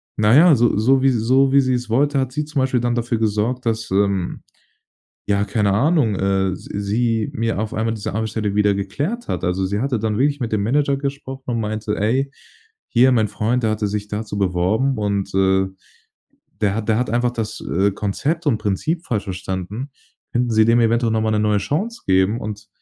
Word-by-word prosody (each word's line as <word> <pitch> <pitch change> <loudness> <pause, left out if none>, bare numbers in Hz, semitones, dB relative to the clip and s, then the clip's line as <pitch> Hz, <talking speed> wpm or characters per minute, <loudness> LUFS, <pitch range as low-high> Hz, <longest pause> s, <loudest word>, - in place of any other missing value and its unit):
na 105 +1 +3
ja, 160 +1 +7
so 120 -3 +2
so 130 +5 +3
wie 135 - +4
so 130 +3 +3
wie 140 - +5
sie‘s 125 -2 -1
wollte, 140 +5 +2
hat 130 -1 -1
sie 150 +3 -2
zum 150 -3 -2
Beispiel 130 -1 +1
dann 120 0 0
dafür 120 0 -1
gesorgt, 110 +4 -1
dass, 115 -1 -2
ähm, 95 -2 0 0.8
ja, 100 0 +1
keine 105 -1 +1
Ahnung, 130 - +2
äh, 95 -1 +1
s 95 - -8
sie 110 +2 0
mir 115 -1 -1
auf 110 - -4
einmal 110 +1 -1
diese 105 -3 -5
Arbeitsstelle 110 -1 -2
wieder 105 -1 +3
geklärt 145 - -3
hat. - - -2
Also, 90 +2 0
sie 100 +2 -2
hatte 125 -2 -1
dann 110 -1 -1
wirklich 145 +2 +1
mit 115 - -2
dem 105 -2 0
Manager 140 +5 +1
gesprochen 135 -1 -5
und 115 -1 -1
meinte: 105 0 -3
„Ey, 130 +7 +1 0.7
hier 130 +2 +6
mein 110 -3 +2
Freund, 120 +5 -1
der 110 - +2
hatte 105 -1 -1
sich 105 0 -3
dazu 105 -1 -4
beworben 100 +8 +1
und, 100 -2 -1
äh, 95 0 +3 1.0
der 105 -2 +1
hat 110 -1 -4
der 110 - +3
hat 125 -3 -1
einfach 120 +1 +1
das, 110 -2 -4
äh, 95 +4 +1
Konzept 135 - -2
und 125 -7 +2
Prinzip 115 - -2
falsch 105 - -2
verstanden, 95 +6 -5 0.4
könnten 120 0 0
Sie 110 -1 +4
dem 115 +2 +4
eventuell 115 0 +2
noch 110 - +1
mal 110 0 0
'ne 105 - +1
neue 105 -1 +2
Chance 170 - -3
geben?“ 95 +4 +2
Und, 105 0 -7
110 Hz, 200 wpm, -20 LUFS, 100-130 Hz, 1.0 s, ja